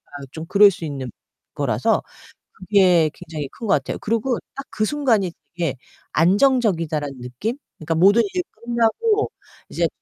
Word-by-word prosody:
아 140 -1 -7
좀 160 0 -7
그럴 200 +3 +6
수 175 -3 -6
있는 135 -4 -5 0.5
거라서 - - +1 0.5
그게 185 -5 +3
굉장히 155 -5 -6
큰 230 - -9
것 - - +1
같아요. 135 -3 -3
그리고 230 +3 0 0.2
딱 275 - -6
그 215 +3 -1
순간이 225 - +1 0.2
되게 165 -6 -1 0.4
안정적이다라는 170 - +2
느낌? 130 - -4 0.2
그니까 165 +1 -2
모든 200 +7 +5
일이 360 -1 -1
끝나고 240 - 0 0.4
이제 - - 0
190 Hz, 305 characters per minute, -21 LUFS, 160-230 Hz, 0.5 s, 그럴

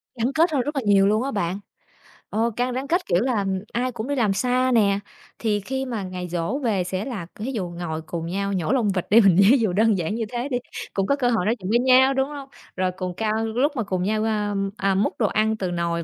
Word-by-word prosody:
Gắn 240 +3 -1
kết 325 +1 +3
hơn 275 -4 +1
rất 295 +3 -4
là 270 - 0
nhiều 200 -1 +5
luôn 215 +4 +2
á 275 - -2
bạn, 175 0 -2 0.7
ờ, 225 +3 0
càng 245 0 -1
rắn 265 +2 -3
kết, 350 +4 +1
kiểu, 175 +3 +2
là 230 -6 0 0.3
ai 250 +1 0
cũng 230 +1 -5
đi 285 - -1
làm 215 -6 +2
xa 255 +4 +1
nè, 200 -4 +3 0.4
thì 210 -3 0
khi 265 +6 -3
mà 230 -6 -4
ngày 180 -1 -5
giỗ 175 - -2
về 200 -6 +1
sẽ 185 +3 -3
là 215 -10 -5
thí 235 +6 -4
dụ 190 -8 -3
ngồi 170 -2 -5
cùng 165 +1 -5
nhau 195 +3 -2
nhổ 180 +1 -1
lông 245 -6 +2
vịt 180 - -2
đi 225 +3 +7
mình 190 -4 +5 0.2
ví 275 - +6
dụ 210 -6 +1
đơn 215 0 +3
giản 175 +5 -2
như 230 - -2
thế 245 +3 -3
đi, 245 - 0 0.4
cũng 195 -1 0
có 280 - +3
cơ 250 -3 +1
hội 220 -7 +1
nói 225 +3 +2
chuyện 185 +1 -5
với 235 +2 +3
nhau, 260 +1 +5
đúng 265 +1 0
hông? 280 -2 -8 0.3
Rồi 185 0 0
cùng 185 -1 -3
cao 220 0 0
lúc 250 +7 +1
mà 235 - -1
cùng 185 -2 -2
nhau, 215 +2 0
a, 210 -2 -1 0.2
à, 195 -1 +1
múc 200 - +1
đồ - - +3
ăn 220 +1 +1
từ 185 -3 -2
nồi 170 -1 -1
215 Hz, 260 wpm, -23 LUFS, 190-250 Hz, 0.7 s, đi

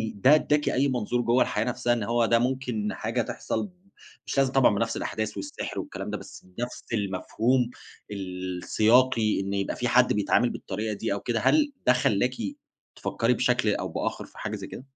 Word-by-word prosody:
ده 130 +9 +6
أدَّاكِ 150 -1 +2
أي 140 +2 +2
منظور 120 -1 0
جوّه 120 +2 +3
الحياة - - -1
نفْسها، 120 0 0
إن 115 -3 -1
هو 115 +1 +2
ده 115 +1 +3
ممكن 125 -4 -1
حاجة 115 +3 -1
تحصل، 195 - -3 0.6
مش - - -3
لازم 135 -1 +3
طبعًا 130 -6 +4
بنفس 115 +2 -1
الأحداث 110 -1 -3
والسحر - - -5
والكلام - - -6
ده، - - -2
بس - - -12
نفس 120 +1 -4
المفهوم 115 +5 0 0.4
السياقي، 105 +5 +1
إن 100 0 -3
يبقى 100 0 -1
في 125 - -1
حد 125 +1 +4
بيتعامل 105 +4 +2
بالطريقة 105 +3 -4
دي، 100 - -2
أو 100 - -2
كده؟ 115 +2 -1
هل 295 - +3 0.2
ده 125 - +7
خلَّاكِ 125 -2 +1 0.6
تفكّري 120 +2 0
بشكل 125 -4 +2
أو - - -3
بآخر - - -3
في - - -19
حاجة - - -4
زي - - -7
كده؟ 130 - -9
120 Hz, 180 wpm, -26 LUFS, 105-125 Hz, 0.6 s, ده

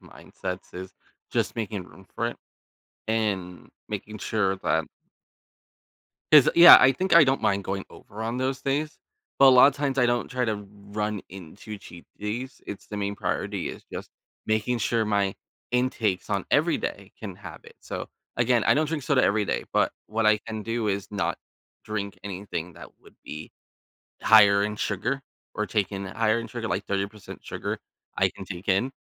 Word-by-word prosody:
mindsets 90 0 -8
is 95 +1 -8 0.4
just - - 0
making 105 -4 -3
room 95 +2 -17
for 115 - -1
it 120 - -4 0.7
and 100 -5 -2 0.2
making 110 0 -5
sure 100 -2 0
that - - 0 1.5
'cause, 150 -4 +9
yeah, 170 +1 +11
I 135 - +6
think 185 +7 0
I 170 -2 +9
don't 135 0 +1
mind 100 -2 +2
going 95 +1 -3
over 110 +2 -10
on 115 +2 -2
those 130 +1 -1
days. 150 +3 -1 0.4
But 135 - +8
a - - +9
lotta 135 +2 +7
times, 140 -2 -1
I 125 - +5
don't 120 0 0
try 125 -1 -1
to 105 -2 -2
run 105 0 -4
into 95 +4 -9
cheat 85 -3 -13
days. 115 +6 -5
It's 100 - -7
the 105 - -6
main 100 0 -2
priority - - -2
is - - -9
just - - -6 0.4
making 110 +3 0
sure 115 +1 +1
my 100 -2 +1 0.4
intakes 120 -6 0
on - - 0
every - - +3
day - - -5
can - - -7
have - - -10
it. - - -14
So, - - -6 0.3
again, 120 -1 +3
I - - +5
don't 155 +2 +2
drink 155 -2 -2
soda 135 -1 +2
every 105 +1 +2
day, - - -2
but - - +3
what 110 +1 -1
I 110 0 +5
can 110 0 -6
do 115 0 -1
is 100 -1 -1
not 100 -2 -1 0.5
drink 105 -2 -4
anything 90 -3 -5
that - - -11
would - - -19
be 75 +1 -8 0.7
higher 100 -2 +7
in 105 +1 -2
sugar 115 +7 -2 0.3
or 105 - -1
take 105 -3 0
in 100 0 -4
higher 110 +3 +1
in 115 - -6
sugar, 115 -2 -5
like 100 -1 -1
30% 100 +1 -4
sugar, - - -4 0.4
I - - +4
can - - -10
take 90 0 -8
in, 100 +7 +2
105 Hz, 180 wpm, -26 LUFS, 100-120 Hz, 1.5 s, yeah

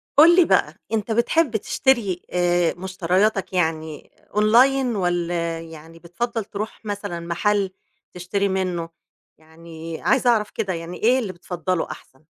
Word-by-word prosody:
قُل 325 +4 +8
لي 360 -2 +6
بقى، - - +2 0.2
أنت 220 0 -1
بتحب 235 +3 +2
تشتري 215 -6 +1
آآ 175 -1 +2
مشترياتك 190 +2 0
يعني 160 -3 -2 0.3
Online 245 +4 +4
والّا 175 -3 -1
يعني 165 0 -12
بتفضّل 225 +7 -3
ترُوح 215 +2 -6
مثلًا 205 -4 -4
محَل 190 +4 0 0.4
تشتري 190 +3 -1
منُّه، 180 -3 -2 0.5
يعني 160 0 -10
عايزة 260 -2 +3
أعرَف 215 -3 +2
كده 190 -2 -2
يعني 170 +1 -6
إيه 250 +4 +4
اللي 210 -7 -4
بتفضّله 180 0 -3
أحسَن؟ 130 +3 -13
185 Hz, 130 wpm, -22 LUFS, 170-220 Hz, 0.5 s, قُل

